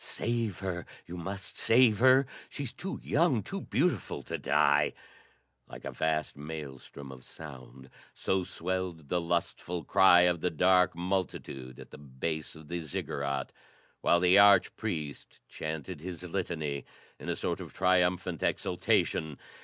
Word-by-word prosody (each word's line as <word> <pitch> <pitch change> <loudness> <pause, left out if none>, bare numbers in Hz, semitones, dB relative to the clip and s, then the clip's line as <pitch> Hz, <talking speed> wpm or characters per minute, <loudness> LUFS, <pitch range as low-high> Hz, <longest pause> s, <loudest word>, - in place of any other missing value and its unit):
"Save 115 -5 -2
her! 90 -3 -3 0.2
You 90 - -8
must 95 +2 -6
save 115 -3 +5
her! 130 +2 +6 0.2
She's 140 -5 -5
too 190 +2 -5
young, 145 -7 +2
too 195 -1 -5
beautiful 145 - 0
to - - -4
die!" - - +3 0.7
Like - - -10
a - - -3
vast 80 -1 -1
maelstrom 70 -2 -8
of 65 -1 -11
sound, 65 -4 -11 0.2
so 95 -1 0
swelled 90 -4 -4
the 90 -1 +1
lustful 85 0 -2
cry 90 +4 +6
of 90 -2 +3
the 90 - +1
dark 90 +2 +4
multitude 85 -8 -3
at - - -12
the - - -11
base 75 +3 -4
of 80 -1 -13
the 85 +2 -3
Ziggurat, 70 -3 -3 0.5
while 85 - +4
the 90 +2 +6
arch 100 0 +6
priest 80 - -5
chanted 80 +1 -5
his 90 0 -7
litany 80 -6 -3 0.4
in - - -6
a - - 0
sort - - -2
of - - -8
triumphant 90 -1 +1
exultation. 80 -3 0
85 Hz, 145 wpm, -30 LUFS, 75-95 Hz, 0.7 s, her